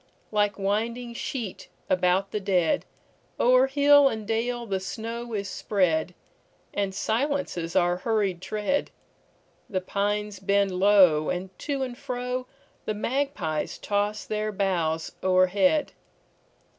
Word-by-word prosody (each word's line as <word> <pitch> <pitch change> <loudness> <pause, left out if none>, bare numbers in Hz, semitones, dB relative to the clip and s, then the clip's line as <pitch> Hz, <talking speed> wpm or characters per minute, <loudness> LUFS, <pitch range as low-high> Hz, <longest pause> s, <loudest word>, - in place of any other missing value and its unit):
Like 205 -1 +1
winding 230 +5 -1
sheet 230 -4 -5 0.2
about 185 +2 +2
the 210 - -1
dead, 190 - +1 0.5
O'er 255 +2 +5
hill 285 0 +6
and 220 -3 -5
dale 235 +2 -1
the 195 -3 -1
snow 230 +4 -5
is 200 -1 -2
spread, 180 -4 0 0.6
And 195 -2 -1
silences 225 - -1
our 175 -1 +3
hurried 195 -3 0
tread; 215 +8 -1 0.8
The 190 - 0
pines 205 +1 -2
bend 200 0 +2
low, 185 -5 +5
and 185 +1 -4
to 280 -2 -2
and 250 -2 -4
froThe 250 0 -4 0.4
magpies 215 - -2
toss 205 +1 -1
their 215 0 -2
boughs 175 -5 -1
o'erhead. 185 - +3
205 Hz, 115 wpm, -26 LUFS, 185-235 Hz, 0.8 s, hill